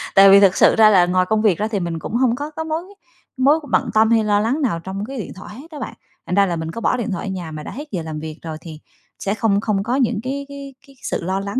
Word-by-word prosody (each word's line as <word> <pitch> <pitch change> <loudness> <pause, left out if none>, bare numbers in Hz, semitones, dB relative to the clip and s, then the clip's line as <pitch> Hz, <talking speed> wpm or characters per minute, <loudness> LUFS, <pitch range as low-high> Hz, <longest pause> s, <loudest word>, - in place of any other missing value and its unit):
tại 195 0 +8
vì 195 +1 +8
thực 195 -2 +5
sự - - +5
ra 220 -1 +7
là 185 -4 +5
ngoài 185 +1 +1
công 220 -1 +2
việc 205 -6 +3
ra 215 - 0
thì 215 -3 -2
mình 170 -2 -3
cũng - - -7
hông 240 -1 +2
có 290 +4 -5
cái 320 +1 -5
mối 320 +1 -2 0.6
mối 280 +5 +4
bận - - +1
tâm 220 +1 +4
hay 225 -1 +4
lo 205 -1 +2
lắng 245 +9 0
nào 210 -11 0
trong 190 +4 -5
cái 270 +2 -7
điện 220 - -5
thoại 190 +3 -10
hết 305 +6 -13
á 300 - -8
bạn. 245 - -5 0.3
Thành 180 - -2
ra 200 0 +5
là 175 -3 -2
mình 160 0 -4
có 230 - -7
bỏ - - +1
điện 235 -3 -3
thoại 190 - -4
ở 190 - -3
nhà 175 -4 -6
mà 155 -1 -7
đã - - -7
hết 295 +4 -8
giờ 180 -5 -2
làm 155 -1 -5
việc 155 +1 -7
rồi, 160 -2 -6
thì 160 -3 -10 0.4
sẽ 200 - -1
không 210 -2 +1
không 205 -3 0
có 240 +4 -1
những 250 -6 +1
cái 275 +2 -4
cái 280 -1 -9
cái 275 - -18
sự - - -3
lo 190 +2 -1
lắng 200 +5 -3
210 Hz, 310 wpm, -20 LUFS, 185-255 Hz, 0.6 s, tại